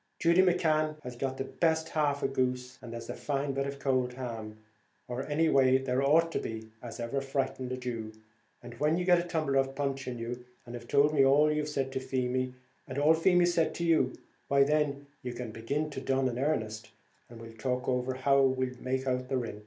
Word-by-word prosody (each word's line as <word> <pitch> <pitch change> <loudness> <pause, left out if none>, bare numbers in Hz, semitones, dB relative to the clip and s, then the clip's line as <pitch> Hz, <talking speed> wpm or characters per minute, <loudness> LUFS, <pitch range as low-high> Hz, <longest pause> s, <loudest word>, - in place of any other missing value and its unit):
Judy 170 +2 +4
McCan 155 -4 +2
has 125 -1 -7
got 130 +1 -3
the - - -2
best 160 +3 0
half 145 -3 0
of 135 - +1
a - - -8
goose, 125 -1 -1
and 120 - -9
there's 115 0 -7
as 120 - -7
fine 140 -1 -1
a - - -5
bit 135 +1 -1
of 140 0 -5
cold 130 -2 0
ham 115 -4 -6 0.5
or 125 +1 -3
any 155 +2 +2
way 130 -3 +5
there 130 0 0
ought 165 +4 +4
to - - -1
be 110 0 -6
as 120 0 -8
ever 120 +4 -2
frightened 135 -2 -2
a 130 - -2
Jew; 115 -3 -4 0.5
and 120 0 -9
when 150 +3 +2
you 180 - -1
get 175 -1 +5
a - - -1
tumbler 155 -5 0
of 135 0 +1
punch 135 -1 -2
in 125 -1 -4
you, 120 +1 -5 0.2
and 120 - -9
have 120 -1 -8
told 145 +3 +4
me 140 -3 +5
all 145 +3 +5
you've 150 0 -1
said 135 -2 -2
to 130 - -2
Feemy, 130 -1 -1 0.4
and 130 - -6
all 150 +3 +5
Feemy's 175 +1 +3
said 165 -2 +1
to 170 - -3
you, 160 -6 +3 0.3
why, 140 0 +5
then 145 -1 0 0.2
you 125 -1 -5
can 120 -2 -6
begin 140 +8 -2
to 135 - -5
dun 135 0 +1
in 120 -1 -3
earnest, 110 -7 -1 0.4
and 120 -1 -11
we'll 115 0 -10
talk 125 +3 -2
over 125 0 0
how 140 +1 +3
we'll 130 -1 +1
make 130 +1 -1
out 130 -1 -1
the 135 - +1
rint." 115 -4 -4
135 Hz, 230 wpm, -30 LUFS, 125-150 Hz, 0.5 s, way